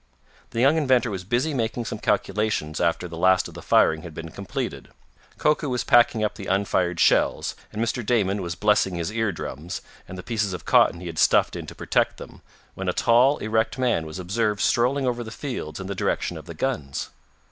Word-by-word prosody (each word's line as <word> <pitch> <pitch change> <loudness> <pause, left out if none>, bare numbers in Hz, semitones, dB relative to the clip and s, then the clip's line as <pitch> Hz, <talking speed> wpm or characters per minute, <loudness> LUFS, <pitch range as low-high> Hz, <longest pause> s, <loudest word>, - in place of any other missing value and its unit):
The 115 - -4
young 140 +5 +5
inventor 130 -6 +2
was 95 -2 -4
busy 120 - 0
making 120 -1 -2
some - - -5
calculations 95 -7 -1
after 85 +1 0
the 85 -1 -8
last 95 +1 +4
of - - -12
the - - -9
firing 80 0 +3
had 80 -2 -10
been 80 0 -7
completed. 100 +2 -5 0.5
Koku 150 -1 +1
was 125 -1 -1
packing 120 -3 +4
up 105 - 0
the 95 - -8
unfired 95 -3 0
shells, - - +3 0.2
and 105 - -6
Mr. 115 +2 -1
Damon 105 -3 +1
was 85 -2 -4
blessing 105 0 +2
his 85 +3 -3
ear 110 -2 0
drums, 85 0 -6 0.2
and 95 - -8
the 90 - -7
pieces 105 -5 -1
of 90 - -7
cotton 85 - +4
he - - -8
had 85 -2 -5
stuffed - - +4
in - - -6
to - - -9
protect - - 0
them, - - -11 0.3
when - - -3
a - - 0
tall, 125 +5 +4
erect 110 +4 0
man 120 -11 0
was 80 - -7
observed 105 +3 -1
strolling 130 +6 +2
over 120 -1 -1
the 110 - -8
fields 115 - -5
in 95 - -6
the 100 - -3
direction 95 - -1
of - - -10
the - - -8
guns. 70 -2 -3
105 Hz, 210 wpm, -24 LUFS, 90-120 Hz, 0.5 s, young